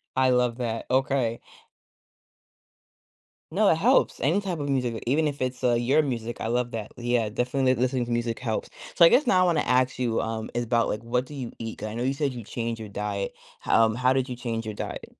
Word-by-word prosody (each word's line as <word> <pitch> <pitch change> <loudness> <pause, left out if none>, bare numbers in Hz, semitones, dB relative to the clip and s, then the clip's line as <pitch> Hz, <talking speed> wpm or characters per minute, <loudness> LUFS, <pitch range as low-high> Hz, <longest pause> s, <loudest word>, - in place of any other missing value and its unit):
I 130 0 +3
love 125 -1 +2
that, 115 -2 -3
okay. 130 -3 +1 2.1
No, - - +3
it - - +4
helps, - - +3
any 170 +9 +2
type 180 -5 -3
of 145 0 -3
music, 125 -4 -1
even 150 +4 +2
if 140 -2 -4
it's, 130 0 -3
uh, 120 -1 +4
your 130 +6 +3
music, 120 -4 -4
I - - -4
love 125 -1 0
that 105 - -7
l - - -9
yeah, 120 -3 +1
definitely 130 +3 +1
li 120 - -3
listening 130 -1 +1
to 120 - -6
music 120 -1 -1
helps, 110 -4 -3 0.2
so, 170 - +4
I 165 - +10
guess, 285 - +4
now 185 -7 +4
I - - +5
wanna 170 -3 +2
ask 130 0 +2
you, 120 -3 0
um, 110 -1 -4
is 120 0 -1
about, 115 0 +2
like, 105 - -3
what 125 +2 0
do 145 - -11
you 130 -4 -5
eat? 115 -1 -6
'Cause, 110 - -4
I 110 - -7
know 120 - -2
you 135 +2 +1
said 140 -1 -1
you 120 -3 -7
changed 115 +1 -4
your 110 -2 -7
diet, 100 -1 -3 0.3
how 115 - +4
um, 110 0 0
how 130 +1 +3
did 130 0 0
you 125 - -4
change 115 -2 -4
your 105 - -4
diet? - - -6
125 Hz, 240 wpm, -26 LUFS, 115-130 Hz, 2.1 s, I